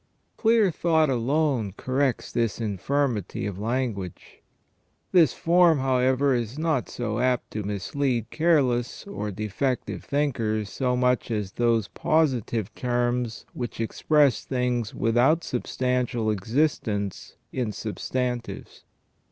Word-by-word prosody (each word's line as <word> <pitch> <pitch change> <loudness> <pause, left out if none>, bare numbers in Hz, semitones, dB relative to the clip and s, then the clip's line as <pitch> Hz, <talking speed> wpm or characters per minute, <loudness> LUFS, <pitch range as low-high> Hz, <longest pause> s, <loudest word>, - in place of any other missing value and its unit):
Clear 225 -4 +3
thought 160 -3 +2
alone 125 - 0
corrects 130 0 -1
this 115 -2 0
infirmity 110 0 -1
of 100 -2 -4
language. 110 -5 -3 0.7
This 165 -8 +6
form, 170 -1 +4
however, 130 +1 +2
is 120 +1 -2
not 155 -5 0
so 115 -2 -3
apt 125 0 0
to 105 - -3
mis 100 -2 -4
lead 130 -6 0
careless 135 -8 +1
or 200 - -4
defective 110 +6 -2
thinkers 115 -8 -1
so 125 -2 0
much 125 -1 +1
as 105 -4 -2
those 115 -3 +1
positive 125 - 0
terms 120 -1 -1
which 120 -3 -5
express 140 +2 +2
things 125 -4 -1
without 125 +9 +3
substantial 125 -2 -1
existence 105 - -1 0.2
in 125 -5 -1
substantives. 120 +3 -4
125 Hz, 110 wpm, -25 LUFS, 110-140 Hz, 0.7 s, This